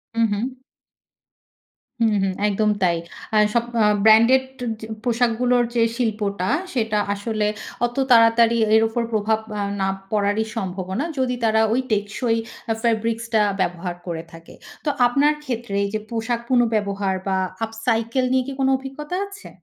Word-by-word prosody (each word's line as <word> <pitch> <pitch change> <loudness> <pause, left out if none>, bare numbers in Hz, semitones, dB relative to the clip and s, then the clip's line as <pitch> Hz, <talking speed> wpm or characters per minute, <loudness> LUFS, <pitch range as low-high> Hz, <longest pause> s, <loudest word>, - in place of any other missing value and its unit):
হু, 230 - +1
হু। 250 +5 -3 1.4
হু, 230 - +3 0.2
হু। 195 - +1 0.2
একদম 210 +1 +1
তাই। 170 -2 +3 0.4
আ - - +5 0.2
সব 235 -1 +2 0.4
ব্র্যান্ডেড 230 +4 +6 0.6
পোশাকগুলোর 245 0 +2
যে 230 - +4
শিল্পটা, 210 -5 -1 0.2
সেটা 220 -4 0
আসলে 210 +1 -2 0.4
অত 240 - -4 0.2
তাড়াতাড়ি 230 0 +5 0.2
এর 220 - +6
উপর 235 +1 -1
প্রভাব 220 0 +1 0.2
আ - - -1 0.2
না 190 - +1 0.2
পড়ারই 210 +1 +1
সম্ভাবনা। 190 - -3
যদি 250 -1 0
তারা 220 -1 +3
ওই 255 - +2
টেকসই 215 +3 0 0.3
আ - - +3
ফেব্রিক্সটা 230 0 +1 0.2
ব্যবহার 175 0 -2
করে 165 -2 -4
থাকে। 165 0 -13 0.3
তো - - +2 0.2
আপনার 285 +5 +3
ক্ষেত্রে 235 -6 -4
এইযে 215 +2 -2
পোশাক 230 +1 -2
পুনঃব্যবহার 205 -6 +1
বা, 190 - +1 0.3
up 225 - -12 0.2
cycle 230 +2 +1
নিয়ে 260 0 +3
কি 275 - -4
কোন 265 - +2
অভিজ্ঞতা 275 +5 -6
আছে? 400 +2 -12
225 Hz, 140 wpm, -22 LUFS, 205-245 Hz, 1.4 s, ব্র্যান্ডেড